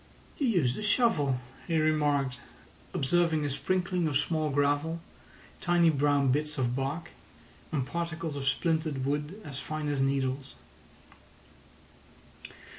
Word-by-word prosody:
"You 280 - +2
used 155 - +2
a - - -4
shovel," 210 - +2 0.3
he 165 -2 +1
remarked, 145 -4 +2 0.5
observing 160 +1 +2
a 145 - -1
sprinkling 180 +3 0
of 145 -3 +2
small 155 +1 0
gravel, 145 +4 +1 0.6
tiny 175 -2 +4
brown 145 -2 +3
bits 150 +2 0
of 125 -2 0
bark, 145 +5 -3 0.6
and 135 -5 0
particles 165 0 -3
of 135 -1 -3
splintered 155 -2 0
wood 150 +7 -2
as 140 -2 -6
fine 155 -1 -4
as 140 -2 0
needles. 135 0 -1
150 Hz, 120 wpm, -29 LUFS, 140-165 Hz, 0.6 s, tiny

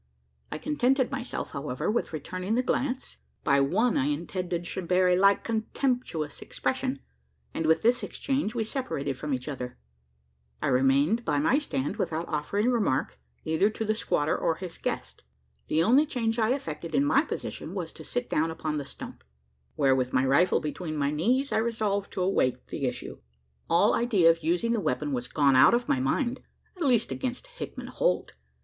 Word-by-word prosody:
I - - -3
contented 265 - +1
myself, 265 -3 -4
however, 140 +4 -2
with 235 - -1
returning 185 +7 -3
the 250 - +2
glance, 265 0 -2 0.2
by 140 -1 +4
one 210 - +2
I 130 - +1
intended 175 +3 -2
should 175 0 -4
bear 180 +1 +4
a 180 - +4
like 195 +2 +4
contemptuous 225 - -2
expression; - - -2 0.5
and, 160 - -1
with 160 - +3
this 240 +2 +3
exchange, 270 -5 -2
we 230 - +1
separated 210 - -3
from 150 +3 -5
each 125 -2 -2
other. 125 -4 -5 0.8
I - - 0
remained 140 - +3
by 150 -7 0
my 160 - +3
stand, 145 - -3
without 165 +1 -2
offering 200 +10 0
remark 195 - 0 0.3
either 160 +6 +3
to 220 +1 -4
the 215 - +2
squatter 155 -9 0
or 165 - 0
his 180 -1 -7
guest. - - -4 0.4
The 160 - +2
only 265 - +5
change 235 -5 -1
I 220 0 +2
effected 165 - -5
in 275 +2 +3
my 285 -1 +4
position, - - -5
was - - -4
to - - -11
sit 245 0 -3
down 160 +2 +1
upon 155 -1 -3
the 145 - -3
stump - - -10 0.5
where, 135 - +3
with 130 -1 -1
my 130 - +3
rifle 155 +7 +4
between 155 +1 -4
my 140 0 +1
knees, 245 - +1
I - - +2
resolved 215 -3 -1
to 185 - -1
await 130 -9 0
the 140 - -3
issue. 125 -1 -4 0.5
All 170 +5 +4
idea 200 -9 +4
of 165 0 -4
using 175 +9 +1
the 230 - +1
weapon 145 -1 -1
was 125 -2 -2
gone 140 -2 +3
out 130 - +7
of 240 0 -1
my 130 - +2
mind 240 - 0 0.3
at 350 -4 -2
least, 240 -4 +2
against 255 - -3
Hickman - - -8
Holt. - - 0
180 Hz, 180 wpm, -28 LUFS, 150-235 Hz, 0.8 s, out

